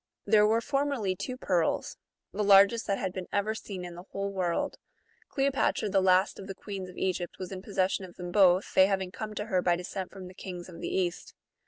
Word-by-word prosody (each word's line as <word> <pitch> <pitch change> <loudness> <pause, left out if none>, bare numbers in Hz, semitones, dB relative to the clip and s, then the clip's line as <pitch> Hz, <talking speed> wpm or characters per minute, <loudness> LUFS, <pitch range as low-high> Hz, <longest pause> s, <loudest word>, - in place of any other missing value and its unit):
There 210 0 +5
were 225 +2 +2
formerly 275 -8 0
two 255 +7 -5
pearls, 175 -9 0 0.4
the 210 +2 -1
largest 200 +4 +6
that 200 -1 +1
had 190 -2 -3
been 185 -1 -5
ever 205 +2 0
seen 195 -4 -7
in 175 - -7
the 175 - -9
whole 200 0 -3
world: 180 -3 -1 0.5
Cleopatra, 270 -6 +1
the 195 0 +3
last 185 +1 +3
of 195 - -8
the 195 - -6
queens 195 -2 -6
of 180 - -12
Egy]^t, 180 -2 -1
M'as 185 0 -6
in 185 -1 -6
possession 190 -1 0
of 175 - -14
them 175 -1 -6
both, 185 -1 +4
they 190 - +6
having 190 -2 -1
come 215 +2 -6
to 210 - -3
her 190 -5 +1
by 175 -1 +3
descent 180 +1 -5
from 190 -2 -9
the 180 - -11
kings 180 -2 -7
of 175 -2 -11
the - - -3
East. 180 -2 -2
190 Hz, 220 wpm, -29 LUFS, 180-210 Hz, 0.5 s, largest